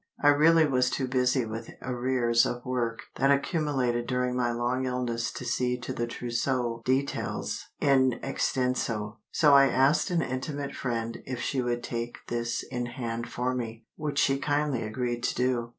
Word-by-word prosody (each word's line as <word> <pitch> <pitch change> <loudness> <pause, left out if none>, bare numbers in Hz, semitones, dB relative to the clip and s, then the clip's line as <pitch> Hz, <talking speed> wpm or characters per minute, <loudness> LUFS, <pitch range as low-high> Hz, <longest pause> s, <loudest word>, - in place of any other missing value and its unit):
I 145 - +5
really 160 +3 +6
was 125 -3 +2
too 130 0 -1
busy 125 -1 +2
with 110 +1 -6
arrears 125 -2 +2
of 120 0 -3
work 120 -3 -1 0.2
that 135 +2 +3
accumulated 140 -5 +1
during 125 -1 0
my 120 -1 +1
long 120 +2 -1
illness 120 -2 -1
to - - -6
see 125 0 0
to 120 - -5
the 120 - -2
trousseau 120 0 -1
details 135 +2 -1
in 130 -2 +4
extenso, 120 -4 -1
so 150 -3 +5
I 140 0 +8
asked 135 +8 +3
an 175 -2 +1
intimate 140 +2 -4
friend 115 -2 -3
if 130 -2 -4
she 130 +1 -1
would 120 -1 -1
take 120 0 -4
this 120 0 -1
in 120 -2 -2
hand 120 -1 -4
for 125 +1 -1
me—which 125 +5 -5
she 135 -1 +3
kindly 145 -3 0
agreed 120 +2 -2
to - - -1
do. 125 -2 0
125 Hz, 165 wpm, -28 LUFS, 120-135 Hz, 0.2 s, I